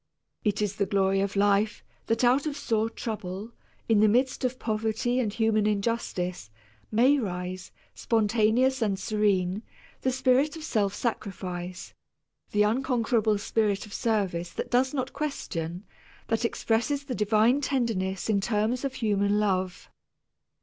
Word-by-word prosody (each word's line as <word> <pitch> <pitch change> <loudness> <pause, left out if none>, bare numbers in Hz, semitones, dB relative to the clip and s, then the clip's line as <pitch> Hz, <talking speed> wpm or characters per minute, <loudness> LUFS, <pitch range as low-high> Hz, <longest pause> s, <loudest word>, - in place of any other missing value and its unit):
It 210 -1 +1
is 205 0 -2
the 200 - +1
glory 195 -1 +2
of 200 0 -2
life 205 +1 +2 0.2
that 225 +2 +1
out 260 +5 +4
of 295 -1 -3
sore 225 -5 0
trouble, 210 -2 -5 0.4
in 225 -2 +4
the 215 - +6
midst 255 +6 +1
of 255 0 0
poverty 220 +2 -1
and 225 -5 0
human 215 -1 +2
injustice, 200 - -2 0.4
may 255 +6 +4
rise, 180 -3 -4 0.2
spontaneous 230 +4 +2
and 205 -3 +1
serene, 195 -1 +1 0.4
the 260 - +1
spirit 260 +3 +2
of 320 - -8
self 205 -9 0
sacrifice, 185 -5 -4 0.6
the 210 0 +3
unconquerable 230 -2 +1
spirit 205 0 0
of 210 - -12
service 190 -7 -1
that - - -5
does 255 +1 +3
not 265 -2 -3
question, 180 - -4 0.5
that 225 +1 +1
expresses 235 +5 0
the 275 -2 -4
divine 220 +5 +3
tenderness 225 -9 -1
in 205 -3 +2
terms 220 +4 0
of 275 -1 -2
human 205 -2 +1
love. 185 -3 -1
215 Hz, 140 wpm, -27 LUFS, 200-245 Hz, 0.6 s, the